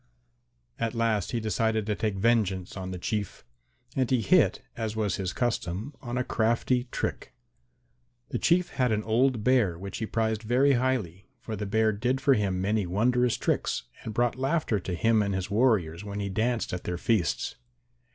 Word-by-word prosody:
At 115 +1 -1
last 115 -4 0
he 120 - 0
decided 110 0 0
to 105 - 0
take 105 -1 -1
vengeance 95 -4 +1
on 95 -1 -5
the 90 - -5
Chief. 100 - -3 0.5
And 130 -3 +1
he 130 -3 +2
hit, 95 - +3
as 110 -2 -3
was 105 -4 0
his 95 -2 -2
custom, 115 -1 -2
on 120 -1 -4
a 125 - +1
crafty 120 +2 +1
trick. 120 - -4 1.0
The - - -2
Chief 175 +1 +3
had 125 -3 0
an 110 0 0
old 115 +1 +2
Bear 110 -9 +3
which 100 +2 -6
he 110 - -2
prized 110 -1 0
very 125 +5 +3
highly, 120 -8 -1
for 115 -2 -5
the 105 0 -4
Bear 110 +2 +2
did 125 +5 0
for 135 0 +4
him 100 -5 0
many 100 0 0
wondrous 120 +6 +2
tricks - - -1 0.2
and 110 - -5
brought 120 +2 +1
laughter 135 -5 +1
to 90 -1 -4
him 110 +4 +3
and 100 -1 -1
his 95 0 -3
warriors 100 -7 +2
when 100 0 -5
he 100 -1 -2
danced 115 +3 -1
at 90 - -4
their 90 - -2
feasts. 95 -4 0
110 Hz, 180 wpm, -28 LUFS, 100-120 Hz, 1.0 s, for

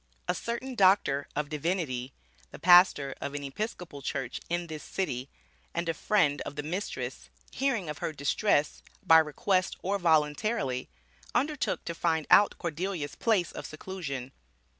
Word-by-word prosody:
A - - +2
certain 235 +3 -4
Doctor 185 - +3
of 150 0 -1
Divinity, 150 -5 -2 0.4
the - - -10
pastor 175 -6 +6
of 140 - -4
an 145 - -4
Episcopal 165 0 -5
church 130 -2 -3
in 175 0 -1
this 155 -2 -7
city 135 -9 -3 0.5
and 170 0 -1
a 165 - +1
friend 155 -5 +2
of - - -6
the 145 - -4
mistress, 180 +7 -4 0.2
hearing 250 - 0
of 150 -1 -5
her - - -2
distress, 145 +2 +1 0.2
by 160 0 +8
request 185 +5 +1
or 200 +2 0
voluntarily, 150 - +1 0.5
undertook 295 +2 0
to 170 - -3
find 160 -2 0
out 205 - +6
Cordelia's 170 -3 -3
place 205 -7 +1
of - - -7
seclusion. 155 -6 -6
165 Hz, 145 wpm, -29 LUFS, 145-190 Hz, 0.5 s, by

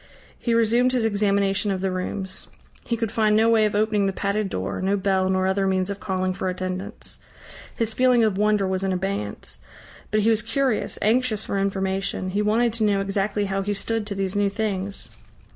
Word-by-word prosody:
He 235 -2 0
resumed 235 +3 +3
his 245 -3 +1
examination 200 -1 +1
of 190 -2 -1
the 190 -1 0
rooms. 185 +1 -3 0.4
He 235 - -1
could 225 -2 -2
find 215 -1 +2
no 225 +1 +4
way 220 -1 +4
of 210 - -1
opening 210 -1 +2
the - - +1
padded 200 +1 -1
door, 95 - -3
no 195 +2 +1
bell 190 -1 +1
nor 185 0 +1
other 195 +1 +1
means 190 0 0
of 200 - -6
calling 185 -2 -1
for 185 0 -2
attendance. 185 +3 -5 0.6
His 225 -1 -1
feeling 250 -1 +4
of 215 -3 +2
wonder 210 0 +2
was 190 0 -1
in 195 - 0
abeyance; 185 - -4 0.5
but 215 0 +2
he 220 - +3
was 220 -1 +2
curious, 235 +1 -1
anxious 225 0 +1
for 200 - -1
information. 195 -1 -1
He 205 +2 0
wanted 225 +2 +2
to 230 -1 0
know 205 -2 +3
exactly 200 +1 -1
how 195 0 -1
he 205 +1 -2
stood 225 +1 -2
to 200 - -4
these 195 0 -2
new 205 0 +2
things. 200 -2 -3
200 Hz, 200 wpm, -24 LUFS, 190-215 Hz, 0.6 s, no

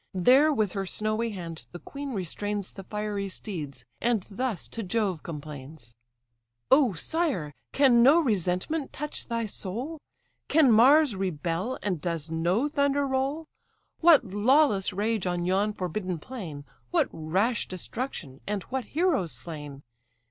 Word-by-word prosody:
There 260 - +5
with 215 -9 +1
her 195 0 -3
snowy 215 +4 -1
hand 170 -5 -7
the - - -5
queen 280 +6 -6
restrains 200 +2 -3
The 195 - -8
fiery 210 -1 -3
steeds, 150 - -6 0.2
and 230 -4 +1
thus 225 -3 -2
to 230 - -4
Jove 195 -4 -1
complains: 145 -5 -9 0.8
"O 265 -5 +5
sire! 185 - -1 0.2
can 260 -4 +5
no 280 +7 +7
resentment 215 - 0
touch 300 +1 -5
thy 230 -1 -1
soul? 240 - -5 0.5
Can 300 -4 +5
Mars 265 +3 +6
rebel, 185 - -2
and 185 -7 -1
does 165 -2 -3
no 175 - +1
thunder 285 -1 +1
roll? 275 +4 -1 0.5
What 320 -6 +6
lawless 220 -1 +3
rage 210 0 -1
on 175 -1 -1
yon 195 +3 +2
forbidden 185 -2 -3
plain, 160 - -8 0.2
What - - +2
rash 190 +9 0
destruction! 185 - -6
and 205 -2 -2
what 260 -1 -4
heroes 310 - 0
slain! 145 -4 -8
205 Hz, 135 wpm, -27 LUFS, 175-260 Hz, 0.8 s, no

